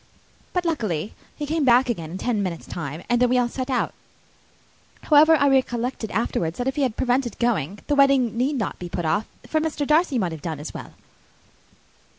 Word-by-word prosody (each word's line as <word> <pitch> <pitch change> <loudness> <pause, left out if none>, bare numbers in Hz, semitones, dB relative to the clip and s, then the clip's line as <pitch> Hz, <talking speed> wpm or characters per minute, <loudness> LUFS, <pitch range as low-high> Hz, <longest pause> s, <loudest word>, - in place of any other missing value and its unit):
But, 360 -1 -1
luckily, 215 - -2 0.2
he 295 - -4
came 310 +1 0
back 255 0 +5
again 170 -10 -3
in 180 - -6
ten 220 0 -1
minutes' 180 -4 -4
time, 155 0 -6
and 240 0 +1
then 250 - +4
we 250 - +3
all 245 -1 +2
set 255 +2 -5
out. 255 - 0 1.1
However, 310 +1 +6
I 285 -2 +3
recollected 250 -4 0
afterwards, 175 -6 -1
that 245 - -2
if 265 - -1
he 295 - -1
had 255 -5 +1
been - - -33
prevented 245 -2 0
going, 205 - 0
the 295 - 0
wedding 275 -5 +4
need 260 +5 0
not 220 -7 -3
be 175 - -6
put 175 -1 -3
off, 180 +8 0 0.2
for 315 - 0
Mr. 310 -2 -2
Darcy 305 -1 +3
might 185 -6 0
have 160 -2 -7
done 160 -3 -4
as 150 - -7
well." - - -9
245 Hz, 205 wpm, -23 LUFS, 190-275 Hz, 1.1 s, However